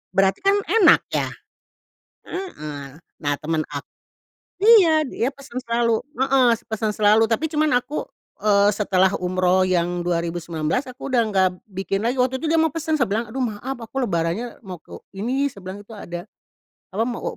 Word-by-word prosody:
Berarti 195 0 +3
kan 395 +1 +4
enak, 385 -2 +6
ya? - - 0 1.0
Heeh. 150 - -7 0.2
Nah, 145 -2 0
teman 155 0 -1
ak - - -6 0.8
iya 390 -8 +7
dia 260 -4 -1
pesan 275 -3 -10
selalu, 235 -2 0 0.2
heeh, 265 -2 +4
si 230 - -4
pesan 220 -1 -1
selalu, 215 +2 +4
tapi 235 +8 0
cuman 310 0 +1
aku, 275 +5 -5 0.4
eee, 200 -1 +5
setelah 195 -2 +2
umroh 185 +1 +2
yang 175 -1 0
2019, 170 - -1
aku 255 +1 -8
udah 250 -3 +3
enggak 190 -3 +2 0.2
bikin 195 +1 -3
lagi. 250 +2 +1
Waktu 260 +1 +1
itu 265 - -6
dia 320 +1 +3
mau 320 - +3
pesan, 320 +1 -3
saya 275 -9 +1
bilang, 220 +4 0
"Aduh 265 - -2
maaf 245 +3 -3
aku 230 +4 -8
lebarannya 170 +6 -2
mau 185 -5 -8
ke 160 - -16 0.2
ini," 260 +7 0
saya 195 -7 -14
bilang 190 +2 -6
gitu, 215 +1 -12
"ada," 175 +1 -7 0.6
apa, 200 +4 -1
"mau," 240 0 -4
220 Hz, 170 wpm, -22 LUFS, 185-265 Hz, 1.0 s, iya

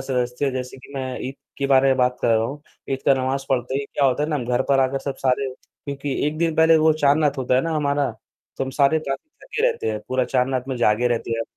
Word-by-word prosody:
सदस्य 125 +1 -1
जैसे 125 0 -5
कि 130 +1 -14
मैं 135 -1 -3 0.2
ईद 135 - -7 0.2
के 140 - 0
बारे 135 0 +5
में 130 - +3
बात 125 -1 +2
कर 115 - +4
रहा 110 0 +2
हूँ, 145 +5 -6 0.3
ईद 135 0 -2
का 135 - +6
नमाज 135 +1 -1
पढ़ते 130 -1 0
ही 140 - -3
क्या 140 - +2
होता 135 +2 +2
है 150 - -1
ना 155 - 0
हम 130 - -3
घर 125 +1 +1
पर 135 -1 +4
आकर 135 +1 +1
सब 140 0 -5
सारे 130 0 +1 0.3
क्योंकि 140 0 -3
1 150 +1 -2
दिन 165 -1 +1
पहले 160 0 +6
वो 160 0 +4
चारनात 150 -1 +2
होता 125 -1 +1
है 130 - +4
ना 165 - -2
हमारा, 145 -2 +1 0.5
तो - - -1
हम 130 - -5
सारे 140 +3 +3
काफ़ी 140 - -5 0.2
थके 460 - -3
रहते 485 - -1
हैं, 110 - -3
पूरा 130 0 +1
चारनात 130 +1 0
में 130 - -2
जागे 120 0 +2
रहते 120 -1 -2
हैं। 115 0 0
135 Hz, 260 wpm, -22 LUFS, 125-145 Hz, 0.5 s, का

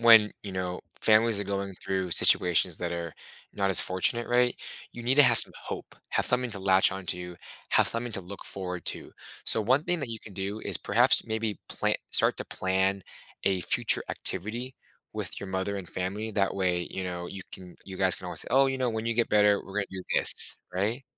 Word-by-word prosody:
when, 115 -2 +7
you 100 - -7
know, 90 -1 -4 0.2
families 110 0 +4
are 100 - -1
going 100 -1 -4
through 95 -1 -3
situations 90 0 +3
that 85 -1 -3
are 85 -2 -5 0.4
not 100 -1 -1
as 95 - +9
fortunate, 95 +6 -1
right, 125 0 +2 0.4
you 120 - -8
need 125 +3 +1
to 145 - +8
have 135 - +4
some - - +7
hope, - - -7
have - - 0
something 125 0 +3
to 100 - -5
latch 95 0 +3
onto, 90 -2 -6 0.4
have - - +4
something 115 0 -2
to 95 - -2
look 95 +3 -10
forward 90 -2 -4
to. - - -2 0.3
So 110 - +3
one 130 +8 +2
thing 175 -1 -1
that 140 - -4
you 115 -1 -5
can 105 - -13
do 100 +3 -4
is - - -1
perhaps - - +3
maybe 110 -2 -3
pla - - -1 0.2
start - - +4
to - - -2
plan 95 +1 -1 0.4
a 95 -2 +1
future - - +3
activity 115 +7 -4 0.4
with - - -5
your 100 - -8
mother 95 +2 -3
and 95 -3 -7
family. 100 +4 -4
That 100 -2 0
way, 90 -2 -1
you 95 - -5
know, 90 -1 -5
you 95 - -8
can 90 -1 -11
you 95 -1 -9
guys 95 -1 +2
can 95 - -10
always 90 - -1
say, - - -4
"Oh, 135 +1 +4
you 135 0 -2
know, 130 -1 0
when 110 -1 -3
you 115 - 0
get 120 0 +1
better, 105 -1 +3
we're 95 - -13
gonna 105 -1 -1
do 95 -1 -7
this," - - +4 0.2
right? 105 +8 -2
100 Hz, 215 wpm, -27 LUFS, 95-115 Hz, 0.4 s, as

